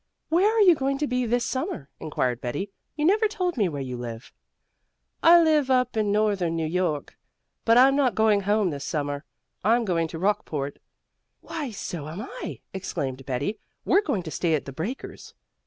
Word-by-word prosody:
"Where 365 +6 +4
are 450 -1 +2
you 370 -4 +8
going 275 -2 -1
to 295 - 0
be 250 -3 -1
this 240 +1 +1
summer?" 260 - -3
inquired 125 -5 -1
Betty. 145 +11 -3 0.2
"You 300 0 0
never 425 +5 +4
told 370 -5 -2
me 205 -7 +2
where 145 -3 -4
you 125 -1 -5
live." 115 -1 -7 0.9
"I 340 +1 +8
live 310 -5 +3
up 250 -2 +2
in 215 -2 +1
northern 200 -5 +1
New 165 -1 -1
York, 160 -3 -2 0.5
but 230 +1 +5
I'm 270 +2 +7
not 260 -7 +2
going 215 -2 +3
home 205 -1 +1
this 140 -1 -5
summer. 145 -1 -3 0.4
I'm 230 +3 +3
going 165 -4 +1
to 160 - -7
Rockport 160 -7 -1 0.3
" - - -52
"Why, 300 -5 -5
so 175 -8 -6
am 165 +5 -7
I!" - - -7
exclaimed 135 -8 -4
Betty. 140 - -2 0.3
"We're 400 - +4
going 210 - -1
to 160 - -7
stay 165 -1 +1
at 150 - -3
The 135 - -7
Breakers." 200 - -6
205 Hz, 190 wpm, -25 LUFS, -, 0.9 s, you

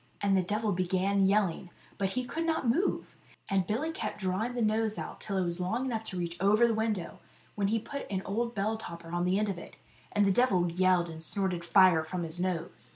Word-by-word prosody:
And 200 -1 +2
the 190 - +4
devil 210 +4 -1
began 190 +2 +1
yelling, 195 -3 +1 0.3
but 195 -1 0
he 255 0 -1
could 330 +6 -3
not 320 -6 0
move, 335 +12 0 0.3
and 190 -3 +1
Billy 280 +10 -1
kept 225 -9 -4
drawing 200 +6 -1
the 240 - -1
nose 220 0 +1
out - - -6
till 200 -2 -2
it 190 - +2
was 170 +1 -3
long 220 +8 -1
enough 230 -4 -2
to 190 - -3
reach 170 -1 -3
over 210 +4 +5
the 235 - +2
window, 215 -5 -2 0.3
when 200 -1 0
he 220 +3 +1
put 280 +5 -6
an 190 -1 -2
old 235 +4 -2
bell 215 +2 0
topper 170 -6 -8
on 175 0 0
the 185 +2 +2
end 210 0 +1
of 185 -3 -3
it. - - -11 0.4
And 205 -1 +3
the 195 - +4
devil 185 -6 +3
yelled, 180 -1 +2
and 160 0 -9
snorted 180 0 0
fire 175 -2 +5
from 175 +2 -4
his 165 +1 -4
nose. 165 - -3
195 Hz, 225 wpm, -30 LUFS, 180-220 Hz, 0.4 s, over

